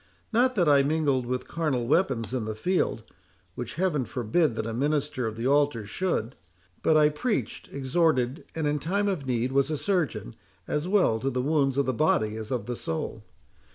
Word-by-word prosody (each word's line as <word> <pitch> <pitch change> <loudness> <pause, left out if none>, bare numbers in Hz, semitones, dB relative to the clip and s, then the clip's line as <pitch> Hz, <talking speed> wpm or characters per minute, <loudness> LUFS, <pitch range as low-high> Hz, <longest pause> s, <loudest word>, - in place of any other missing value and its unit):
Not 255 +3 +3
that 175 -5 +2
I 140 -1 +6
mingled 140 -4 +1
with 125 0 -3
carnal 150 -8 -1
weapons 130 - +1
in 125 -4 -1
the 110 0 -4
field—which 110 - -4
Heaven 165 -5 +1
forbid 125 +5 0
that 110 - -2
a 115 - -3
minister 145 -1 0
of 110 - -4
the 115 - -3
altar 140 -5 +2
should—but 105 - -2
I 150 -1 +6
preached, 215 +10 -2
exhorted, 140 -1 +1
and, 160 -2 -1
in 150 0 +1
time 200 +7 0
of 175 -9 -2
need, 125 0 0
was 140 +1 +2
a 155 - -1
surgeon, 160 - -1 0.3
as 150 +3 -1
well 185 - +3
to 135 - -1
the 125 -1 -1
wounds 140 -2 +1
of 140 - +2
the 130 - 0
body 110 -6 +1
as 110 -1 -6
of 125 -5 -2
the 120 - -3
soul. 80 -7 -4
135 Hz, 185 wpm, -27 LUFS, 115-155 Hz, 0.3 s, I